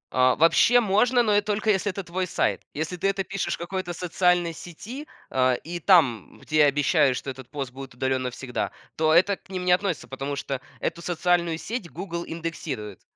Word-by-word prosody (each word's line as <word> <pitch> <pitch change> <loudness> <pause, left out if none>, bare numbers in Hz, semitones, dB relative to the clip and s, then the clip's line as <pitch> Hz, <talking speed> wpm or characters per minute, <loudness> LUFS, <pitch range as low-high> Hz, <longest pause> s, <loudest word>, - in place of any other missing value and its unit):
А 130 0 +4
вообще 200 +9 +5
можно, 240 +4 +3
но 205 -2 +3
только 210 +1 0
если 200 +1 +1
это 195 - -5
твой 180 +1 -3
сайт. - - 0
Если 160 +4 -3
ты 195 - 0
это 195 -1 -1
пишешь 195 0 -2
в - - -17
какой-то 175 0 -4
социальной 180 0 +1
сети, 220 - -9 0.2
э, 130 -1 +3
и 175 +2 -5
там, 145 - +3
где 155 - -3
я 150 - +7
обещаю, 145 -1 +3
что 135 - -4
этот 130 -1 -11
пост 135 -3 -5
будет 135 -1 -10
удалён 130 0 0
навсегда, 125 0 -3 0.2
то 155 0 +2
это 190 +4 +4
к - - -28
ним 185 -1 -4
не 180 - +3
относится, 180 -4 +1
потому 135 +1 -4
что 135 -2 -4 0.2
эту 170 - -3
социальную 170 -1 +1
сеть 215 -1 -5
"Гугл" 170 +2 -5
индексирует. 155 - -5
170 Hz, 190 wpm, -25 LUFS, 135-190 Hz, 0.2 s, я